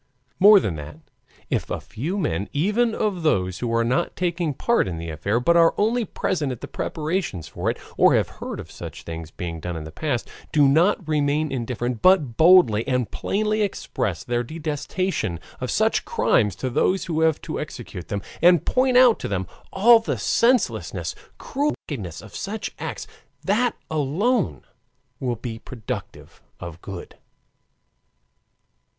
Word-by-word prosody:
More 205 +1 +9
than 90 - -2
that, 75 0 -8 0.5
if - - -1
a - - -2
few 160 - -4
men, 100 - -1
even 210 +9 +1
of 200 -5 -1
those 95 - +1
who 120 -2 -2
are 115 0 +2
not 125 +3 0
taking 175 -2 -1
part 235 - +2
in 85 -3 -4
the 85 0 -5
affair 100 +9 0
but 170 +8 +3
are 165 -1 +5
only 225 +3 +1
present 155 -10 -2
at 125 - -7
the - - -6
preparations 155 - -3
for - - -2
it, - - -2 0.2
or - - +6
have - - +2
heard - - -5
of - - -9
such - - -9
things 80 -1 -7
being 85 -1 -6
done 85 +1 -4
in 80 - -6
the 80 - -9
past, 120 - -2 0.2
do 145 -2 +5
not 170 +5 +3
remain 150 0 +1
indifferent 120 -2 -3
but 170 -11 +4
boldly 160 - +6
and 125 -3 0
plainly 215 +1 0
express 110 - -2
their 120 0 -1
detestation 155 - -3 0.2
of - - -3
such - - +2
crimes 105 -3 +2
to 130 - -3
those 185 +9 +1
who 160 -2 -1
have 160 -1 +3
to - - -4
execute 90 - -7
them, 100 -1 -3 0.2
and 175 -1 +5
point 255 0 +3
out 250 -3 +6
to - - -4
them 95 -2 -2 0.3
all 230 +4 +6
the 225 - -3
senselessness, 245 +1 +1 0.2
cruelty, 290 +2 -1
and 145 -5 -3
wickedness 85 -4 -7
of 110 - -13
such 210 +2 -4
acts, - - -5 0.4
that 235 +5 +1 0.2
alone 170 - 0 0.6
will 125 -3 -1
be 115 0 -6
productive 115 -3 -7 0.2
of 85 0 -8
good. 95 -3 -8
150 Hz, 165 wpm, -23 LUFS, -, 0.6 s, More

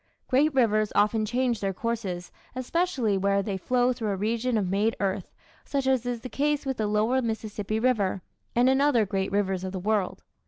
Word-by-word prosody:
Great 290 +4 +3
rivers 215 -4 +3
often 215 +1 +2
change 245 0 0
their 195 -2 -1
courses, 200 -6 -3 0.2
especially 255 - 0
where 200 +1 +2
they 200 -1 -3
flow 250 +6 +1
through 225 -3 -3
a 200 - 0
region 230 +4 0
of 200 -3 0
made 205 +4 +1
earth, 195 -2 -2 0.3
such 275 -2 -2
as 260 -2 +1
is 240 -2 -2
the 255 - -6
case 290 +2 0
with 265 -2 -2
the 215 - 0
lower 215 +5 +2
Mississippi 220 -2 -3
River, 205 -7 +1 0.3
and 240 +1 +4
in 265 +1 +4
other 265 -7 +4
great 190 0 -2
rivers 195 -2 0
of 190 0 -4
the 190 - -3
world. 205 0 -1
220 Hz, 195 wpm, -27 LUFS, 200-255 Hz, 0.3 s, and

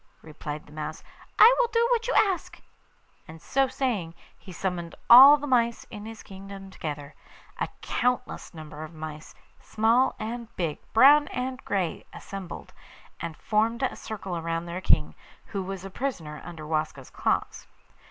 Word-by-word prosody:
replied 150 -1 -7
the - - -18
mouse; 155 0 -6 0.3
'I 475 +3 +9
will - - +4
do 465 0 +3
what 475 0 +1
you - - 0
ask.' 385 -4 +1 0.7
And, 160 +1 -11
so 270 - +1
saying, 215 -12 -2 0.2
he 190 - -13
summoned 175 -1 -4 0.2
all 270 +5 +11
the 290 - -6
mice 235 -4 +1
in 210 -1 -8
his 225 0 -9
kingdom 195 0 -10
together. 150 -4 -6 0.5
A - - 0
countless 250 0 -1
number 155 -2 -10
of 155 +1 -10
mice, 155 0 -8 0.2
small 230 +4 +2
and 230 +2 -5
big, 165 -4 -2
brown 290 +5 +7
and 255 +1 -4
grey, 190 -5 -1
assembled, 195 -3 -8 0.5
and 165 -2 -6
formed 225 +3 0
a 260 - 0
circle 190 -5 -5
round 165 +1 -3
their 175 +2 -5
king, 75 - +3 0.3
who 200 - -4
was 190 0 -6
a 195 - -8
prisoner 175 - -4
under 165 -3 -9
Waska's 155 -4 -3
claws. - - -1
195 Hz, 155 wpm, -27 LUFS, 160-250 Hz, 0.7 s, all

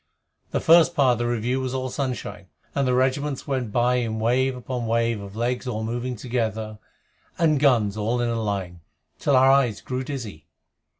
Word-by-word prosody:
The - - -1
first 170 +1 +5
part 135 -3 +4
of - - -2
the 120 - 0
review 120 +2 -1
was 130 0 -3
all 130 -1 -3
sunshine, 125 -8 -4 0.3
and 140 -2 0
the 125 - +2
regiments 135 +2 0
went 130 -6 -2
by 125 +2 +2
in 115 -3 -2
wave 130 +3 +1
upon 125 -1 -4
wave 115 -1 0
of 100 0 -10
legs 125 +3 -2
all 110 -3 -3
moving 120 +3 -3
together, 110 -3 -3 0.6
and 155 -4 +3
guns 120 -8 +3
all 115 +3 0
in 120 -1 0
a 115 -1 -1
line, 95 -5 -3 0.4
till 140 - +2
our 130 +1 +6
eyes 130 -6 +2
grew 130 0 -4
dizzy. 110 - -7
125 Hz, 185 wpm, -24 LUFS, 110-130 Hz, 0.6 s, our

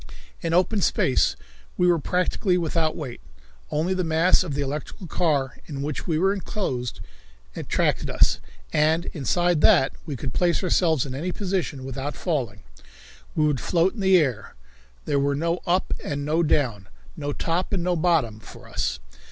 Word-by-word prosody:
In 165 - -2
open 185 +5 +2
space 135 -6 +2 0.4
we 180 - +3
were 175 -2 +4
practically 180 +3 +1
without 165 -2 0
weight. 130 -6 -6 0.5
Only 165 +5 0
the 185 -1 -1
mass 165 +2 +4
of 155 -6 -4
the 145 - 0
electrical 150 +7 -5
car 145 -6 0
in 140 -3 -5
which 150 -1 -4
we 160 -3 +1
were 190 +4 +3
enclosed 135 - -3 0.5
attracted - - 0
us, - - +3 0.3
and 155 +2 +3
inside 175 +2 +1
that 160 -10 +5 0.2
we 145 - -3
could 130 -1 -5
place 175 +1 +1
ourselves 165 -6 +2
in 130 - -6
any 165 +7 -3
position 180 -9 -2
without 135 +2 -4
falling. 125 - -2 0.7
We 155 - +3
could 145 -4 +1
float 175 +1 +2
in 235 - -10
the 190 -1 +5
air. 130 - -1 0.5
There 145 -1 +1
were 140 0 +1
no 170 +4 0
up 180 +2 +1
and 145 -1 -3
no 155 +3 +2
down, 125 - +1 0.3
no 145 -1 -3
top 170 +5 -1
and 190 -4 0
no 180 0 +1
bottom 155 -10 +1
for 105 - -13
us. 65 +1 -2
160 Hz, 170 wpm, -24 LUFS, 140-180 Hz, 0.7 s, that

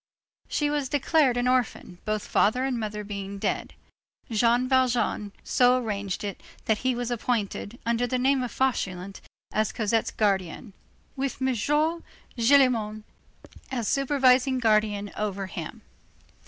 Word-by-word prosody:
She 295 -1 0
was 290 -3 -1
declared 290 -2 +2
an 245 0 +1
orphan, 245 -8 -1
both 215 -1 -2
father 250 +5 +2
and 255 -3 -1
mother 210 -1 -4
being 200 -1 -6
dead. - - -2 0.6
Jean 235 +3 +3
Valjean 250 -5 +1
so 250 0 +4
arranged 205 -6 -3
it 200 -2 -5 0.2
that 220 -2 +1
he 255 -1 0
was 245 0 -3
appointed, 230 -2 -2
under 235 +1 +1
the 255 - 0
name 265 +1 +2
of 250 - -2
Fauchelevent, 195 -7 -2 0.3
as 215 -1 +1
Cosette's 225 0 0
guardian, 195 -2 -1 0.4
with 275 0 -3
M. 265 0 +1
Gillenormand 255 -5 +1 0.7
as 240 -5 -2
supervising 265 -1 +3
guardian 215 -3 +1
over 200 -2 -2
him. 190 - -7
235 Hz, 130 wpm, -26 LUFS, 210-260 Hz, 0.7 s, so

